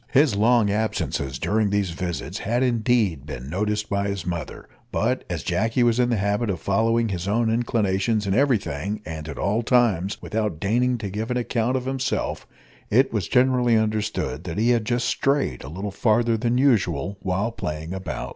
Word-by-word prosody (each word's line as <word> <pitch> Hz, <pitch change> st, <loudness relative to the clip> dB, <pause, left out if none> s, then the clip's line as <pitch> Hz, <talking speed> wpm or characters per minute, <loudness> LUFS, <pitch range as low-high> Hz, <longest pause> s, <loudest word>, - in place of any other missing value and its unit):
His 140 Hz, -4 st, +4 dB
long 110 Hz, 0 st, +3 dB
absences, 100 Hz, -10 st, -1 dB
during 105 Hz, +8 st, +1 dB
these 100 Hz, -3 st, 0 dB
visits, 85 Hz, -2 st, -4 dB
had 120 Hz, +4 st, 0 dB
indeed 115 Hz, -, +1 dB
been 70 Hz, -1 st, -7 dB
noticed 105 Hz, +3 st, -1 dB
by 100 Hz, 0 st, -1 dB
his 100 Hz, -4 st, -3 dB
mother; 85 Hz, -4 st, -5 dB, 0.2 s
but -, -, 0 dB
as -, -, -3 dB
Jacky 115 Hz, +3 st, +1 dB
was 120 Hz, 0 st, +3 dB
in 120 Hz, -1 st, +3 dB
the 120 Hz, -, +1 dB
habit 105 Hz, +3 st, 0 dB
of 90 Hz, -4 st, -2 dB
following 115 Hz, +5 st, +1 dB
his 90 Hz, -1 st, -3 dB
own 110 Hz, +2 st, +1 dB
inclinations 110 Hz, -2 st, +1 dB
in 95 Hz, -, 0 dB
every 130 Hz, +1 st, +4 dB
thing 100 Hz, +4 st, -4 dB
and 80 Hz, -1 st, -6 dB
at 75 Hz, -, -7 dB
all 105 Hz, +4 st, 0 dB
times, 110 Hz, -6 st, +2 dB
without 105 Hz, -7 st, -2 dB
deigning 120 Hz, +6 st, +1 dB
to 105 Hz, -3 st, -5 dB
give 110 Hz, +4 st, -3 dB
an 125 Hz, -, 0 dB
account 120 Hz, +1 st, 0 dB
of 130 Hz, -, -4 dB
himself; 135 Hz, 0 st, -2 dB, 0.4 s
it 130 Hz, +4 st, +3 dB
was 105 Hz, -6 st, -1 dB
generally 125 Hz, -2 st, +3 dB
understood 105 Hz, -10 st, -1 dB
that 85 Hz, 0 st, -5 dB
he 115 Hz, +3 st, +3 dB
had 115 Hz, -3 st, +1 dB
just 120 Hz, +1 st, 0 dB
strayed 135 Hz, -, 0 dB
a 65 Hz, -, -8 dB
little 95 Hz, +6 st, -5 dB
farther 115 Hz, +3 st, +2 dB
than 120 Hz, +2 st, 0 dB
usual 100 Hz, -, +1 dB
while 95 Hz, +5 st, -1 dB
playing 80 Hz, -4 st, -5 dB
about. 95 Hz, 0 st, -5 dB
105 Hz, 185 wpm, -24 LUFS, 95-120 Hz, 0.4 s, His